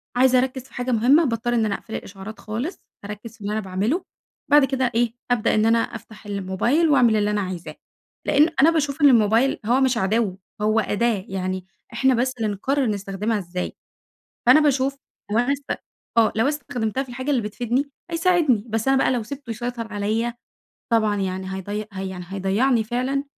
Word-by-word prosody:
عايزة 255 0 +5
أركز 260 0 -2
في 265 - -21
حاجة 245 +1 -2
مهمّة 250 +8 +5
باضطر 240 -3 -1
إن 230 -2 +2
أنا 205 -2 0
أقفل 220 - -8
الإشعارات 200 +3 -8
خالص، 235 - -4 0.3
أركز 210 +2 -8
في 225 - -23
اللي 205 +1 -3
أنا 215 - 0
باعمله، 210 - -1 0.5
بعد 295 -1 +7
كده 260 -2 0
إيه 235 -1 +2 0.2
أبدأ 235 -2 +2
إن 215 0 +3
أنا 225 +1 +4
أفتح 220 -2 -6
الموبايل 205 - +1
وأعمل 250 -6 +5
اللي 210 -1 +1
أنا 210 0 0 0.2
عايزاه؛ 170 - -9 0.5
لأن 295 +3 +4
أنا 305 - +7
باشوف 300 -2 -1
إن 290 - +8
الموبايل 230 +2 +3
هو 245 +4 +3
مش 260 -2 +2
عدو 200 -1 0 0.2
هو 215 +1 +3
أداة 215 -2 0
يعني، 185 -1 -3 0.3
إحنا 265 +3 +3
بس 255 +2 0
اللي 225 - -1
نقرر 270 +7 0
نستخدمها 205 +1 -2
إزاي. 180 -1 -5 0.7
فأنا 305 - +8
باشوف 275 -2 +2 0.4
لو 215 - +2
أنا 245 +4 +2
اس 285 0 -4 0.4
آه 225 -1 +5
لو 225 +4 +2
استخدمتها 260 -4 -2
في 265 - -15
الحاجة 260 +3 -5
اللي 260 -4 +2
بتفيدني 240 +6 -1 0.2
هيساعدني، 330 - +2
بس 225 +3 -1
أنا 270 - +4
بقى 270 - +3
لو 245 -3 0
سِبته 275 +2 -9
يسيطر 230 -1 -4
عليَّ 220 +3 -1 0.6
طبعًا 215 -2 +3
يعني 190 0 -3
هيضي 205 +3 -4
هي 190 0 -4
يعني 180 -1 -7
هيضيعني 205 +6 +1
فعلًا، 255 +5 -1
230 Hz, 185 wpm, -23 LUFS, 210-265 Hz, 0.7 s, إن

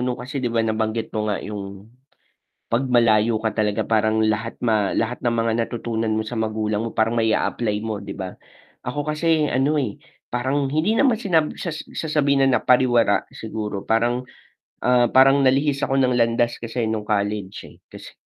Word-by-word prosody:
'no 125 0 -1
kasi 135 +2 -5
'di 125 - -1
ba, 115 -1 0
nabanggit 110 0 -2
mo 105 0 -2
nga 100 - 0
yung 100 0 -8 0.8
'pag 120 +4 +2
malayo 115 -2 +3
ka 110 - +1
talaga 105 +1 0
parang 110 0 +2
lahat 110 +1 -1
ma 110 -3 +1
lahat 115 +2 -1
ng 120 - +2
mga 115 0 +1
natutunan 115 -2 -3
mo - - +1
sa 120 +2 -6
magulang 110 -1 -1
mo 115 - -3
parang 110 +1 +1
mai-a-apply 110 -1 0
mo 110 -2 -3
'di - - -7
ba? 95 -1 -6 0.5
Ako 145 +4 -3
kasi 155 0 +1
ano, 135 +4 +1
eh, 125 -9 -2 0.3
parang 135 +3 0
hindi 165 +9 +1
naman 255 -2 +3
sinab 165 -8 +1
sa - - -3
sasabihin 150 -3 0
na 125 -4 +2
napariwara 120 -4 +3
siguro, 105 -3 -5
parang, 120 +3 +1 0.6
ah, 125 -1 +4
parang 135 +2 +5
nalihis 135 +2 +2
ako 135 - 0
ng 125 -1 +2
landas 120 0 +1
kasi 115 +1 -3
nung 105 -1 -4
college, 105 -1 -2
eh. - - -18
'Tas, - - -12
115 Hz, 175 wpm, -22 LUFS, 110-130 Hz, 0.8 s, parang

